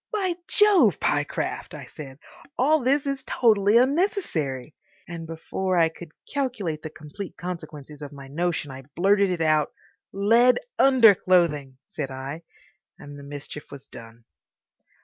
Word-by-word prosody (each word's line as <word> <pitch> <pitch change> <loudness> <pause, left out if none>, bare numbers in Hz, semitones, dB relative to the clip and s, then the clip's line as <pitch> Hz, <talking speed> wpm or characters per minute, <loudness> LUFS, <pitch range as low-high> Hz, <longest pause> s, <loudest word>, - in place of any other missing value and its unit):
"By 390 -5 0
Jove, 385 - +4
Pyecraft!" 145 0 -2
I - - -8
said, 135 -3 -10 0.4
"all 305 +5 +3
this 270 +2 +1
is 275 -1 -3
totally 215 -2 +3
unnecessary." 250 - 0 0.3
And 165 -1 -7
before 180 +3 -2
I 165 -1 +4
could 165 0 -12 0.2
calculate 225 - -2
the 155 - -6
complete 155 +6 -9
consequences 155 -5 -8
of 145 - -7
my 140 -2 -11
notion 165 0 -2
I 130 0 -8
blurted 200 +3 +3
it 180 -2 -2
out. 155 -2 +2 0.4
"Lead 230 +5 +4 0.2
underclothing," 180 - +4
said 140 -3 -5
I, 135 +4 -6 0.6
and 145 0 -11
the - - -11
mischief 145 +1 -9
was 140 -1 -11
done. 115 -1 -13
170 Hz, 135 wpm, -25 LUFS, 145-235 Hz, 0.6 s, Jove